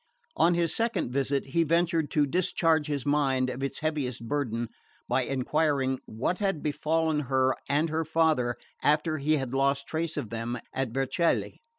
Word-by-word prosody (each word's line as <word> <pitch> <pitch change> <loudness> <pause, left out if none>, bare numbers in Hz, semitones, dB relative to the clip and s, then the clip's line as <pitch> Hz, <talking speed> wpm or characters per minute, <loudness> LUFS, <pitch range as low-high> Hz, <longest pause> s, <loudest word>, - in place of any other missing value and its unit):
On 170 +1 +4
his 170 -1 +1
second 225 - 0
visit 140 +1 0
he 165 +4 +2
ventured 165 -1 +1
to 150 -1 +2
discharge 165 -1 +1
his 145 -4 -2
mind 135 -3 +2
of 130 - -6
its 135 +2 -3
heaviest 135 -7 -2
burden 120 -4 -1 0.4
by - - +2
enquiring 135 0 0
what 125 +11 -2
had 195 -7 -1
befallen 155 +1 0
her 130 -1 +3 0.2
and 150 +4 +2
her 160 +1 0
father 160 -6 +2 0.3
after 155 +1 +2
he 155 +2 +2
had 135 -2 -4
lost 140 +1 +1
trace 160 0 -2
of 110 - -4
them 115 +1 -3 0.2
at 135 -2 -1
Vercelli. 135 +7 0
145 Hz, 165 wpm, -28 LUFS, 130-160 Hz, 0.4 s, On